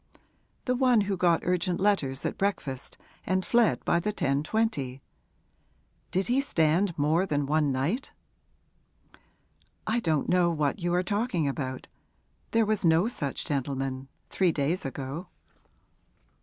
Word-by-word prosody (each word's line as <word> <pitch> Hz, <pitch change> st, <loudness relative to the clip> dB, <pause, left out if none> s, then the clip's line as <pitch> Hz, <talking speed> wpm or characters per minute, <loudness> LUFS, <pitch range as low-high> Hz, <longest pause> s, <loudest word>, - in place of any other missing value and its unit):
'The 250 Hz, -, +1 dB
one 250 Hz, -3 st, +4 dB
who 200 Hz, -1 st, -1 dB
got 175 Hz, -2 st, +3 dB
urgent 180 Hz, 0 st, 0 dB
letters 170 Hz, -10 st, +1 dB
at -, -, -1 dB
breakfast 145 Hz, -10 st, -3 dB, 0.3 s
and 185 Hz, 0 st, 0 dB
fled 235 Hz, -2 st, +2 dB
by 170 Hz, -, +3 dB
the 210 Hz, +5 st, -1 dB
10.20. 145 Hz, -, -1 dB, 1.1 s
Did 190 Hz, +1 st, 0 dB
he 250 Hz, +3 st, +2 dB
stand 170 Hz, -, +1 dB
more 160 Hz, +6 st, +2 dB
than 145 Hz, -4 st, 0 dB
one 150 Hz, 0 st, +2 dB
night?' 150 Hz, -, -1 dB, 1.7 s
'I 220 Hz, +2 st, +1 dB
don't 160 Hz, -9 st, 0 dB
know 180 Hz, -1 st, +3 dB
what 150 Hz, -2 st, 0 dB
you 175 Hz, -1 st, -1 dB
are 180 Hz, -, +2 dB
talking 205 Hz, -, 0 dB
about. 130 Hz, -2 st, -3 dB, 0.6 s
There 225 Hz, -1 st, +3 dB
was 215 Hz, -1 st, 0 dB
no 165 Hz, +4 st, +4 dB
such 145 Hz, -, -3 dB
gentleman 135 Hz, -1 st, -2 dB, 0.2 s
three 185 Hz, -3 st, +2 dB
days 155 Hz, +4 st, -1 dB
ago.' 135 Hz, +6 st, -5 dB
170 Hz, 130 wpm, -28 LUFS, 140-200 Hz, 1.7 s, one